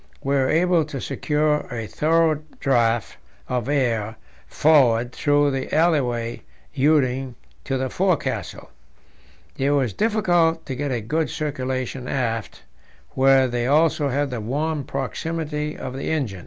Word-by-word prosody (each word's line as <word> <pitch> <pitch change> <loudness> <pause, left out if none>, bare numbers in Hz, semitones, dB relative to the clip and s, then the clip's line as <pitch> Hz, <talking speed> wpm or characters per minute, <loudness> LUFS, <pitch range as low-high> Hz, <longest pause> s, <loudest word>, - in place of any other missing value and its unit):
We 140 - 0
were 135 -2 +2
able 175 0 +3
to 145 -2 -6
secure 150 +3 0
a 115 -2 -4
thorough 155 +4 +1 0.2
draught 120 - +1 0.3
of 125 0 -2
air 115 -6 0 0.3
forward 125 -6 +3
through 145 +1 +2
the 135 -1 -4
alleyway 125 -8 +1 0.3
leading 135 -3 +1 0.3
to 135 -1 -1
the 130 0 -1
forecastle; 180 +3 -2 0.9
it 135 +1 +2
was 135 -6 +1
difficult 180 -7 +1
to 135 - -4
get 145 +1 -3
a 120 -3 -1
good 155 +9 -1
circulation 130 -4 -3
aft, 115 -4 -3 0.5
where 135 0 +4
they 120 0 -2
also 150 0 +3
had 140 +1 -1
the 120 -3 -4
warm 145 +5 -2
proximity 150 +3 -3
of 130 0 -6
the 135 - -4
engine. 130 -12 -2
135 Hz, 135 wpm, -23 LUFS, 125-155 Hz, 0.9 s, where